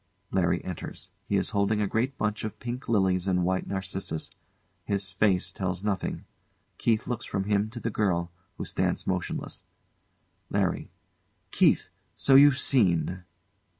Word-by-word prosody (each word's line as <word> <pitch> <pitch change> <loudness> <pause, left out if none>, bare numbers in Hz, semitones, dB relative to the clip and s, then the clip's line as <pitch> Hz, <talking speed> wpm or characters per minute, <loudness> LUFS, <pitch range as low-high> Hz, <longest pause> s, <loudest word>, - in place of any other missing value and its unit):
LARRY 85 -3 +1
enters. 90 -3 -6 0.2
He - - 0
is - - 0
holding 100 +1 +1
a 105 - +2
great 120 +7 -1
bunch 105 0 -1
of 110 - -4
pink 120 +2 -6
lilies 95 -4 +2
and 90 -1 +2
white 95 +1 0
narcissus. 95 -4 -3 0.5
His 100 -2 -2
face 95 -1 +2
tells 95 -1 -3
nothing. 105 -2 -2 0.5
KEITH 110 -1 +2
looks 120 -1 -3
from 95 - -2
him 105 +1 +1
to 120 +2 -7
the 115 - -2
girl, 85 -5 0 0.3
who - - -4
stands - - -1
motionless. - - -3 0.9
LARRY. - - 0 0.6
Keith! - - +3 0.3
So 135 - +4
you've 140 0 +8
seen? 90 - +2
100 Hz, 145 wpm, -28 LUFS, 95-110 Hz, 0.9 s, you've